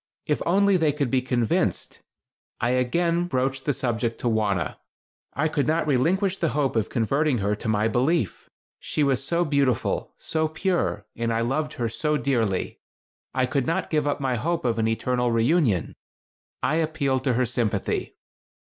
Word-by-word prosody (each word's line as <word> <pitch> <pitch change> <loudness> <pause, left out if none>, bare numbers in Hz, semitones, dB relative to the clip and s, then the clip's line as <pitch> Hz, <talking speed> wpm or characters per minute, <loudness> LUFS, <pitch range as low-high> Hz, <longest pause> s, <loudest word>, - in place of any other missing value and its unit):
If 150 - 0
only 200 +2 +4
they 160 -3 +2
could 140 -4 -1
be 130 - +3
convinced. 125 -3 -1 0.6
I 120 - +1
again 170 +8 +1
broached 135 -4 -1
the 145 - +2
subject 115 -3 -2
to - - -1
Wauna. 105 -7 0 0.6
I 155 +3 +1
could 155 -3 0
not 160 +1 +1
relinquish 180 +8 +1
the 165 - 0
hope 140 -4 +1
of 110 -2 0
converting 135 +4 +1
her 105 0 0
to - - -6
my 110 0 +2
belief. 125 - 0 0.3
She 150 - -1
was 135 -2 +1
so 170 +5 +1
beautiful, 140 -5 0
so 160 -1 -1
pure, 175 +3 -1
and 115 0 -1
I 115 0 +1
loved 150 +6 -1
her 120 - -2
so 150 +7 0
dearly. 115 -10 -1 0.6
I 130 -1 +3
could 130 0 -1
not 165 - -1
give 150 -2 +1
up 145 - 0
my 135 -2 0
hope 165 +5 -1
of 115 -2 +1
an 110 - +2
eternal 125 +2 0
reunion. 115 - +2 0.7
I 155 - +2
appealed 150 -5 0
to 130 - +2
her 125 +2 +2
sympathy. 105 -4 -1
135 Hz, 170 wpm, -25 LUFS, 115-155 Hz, 0.7 s, only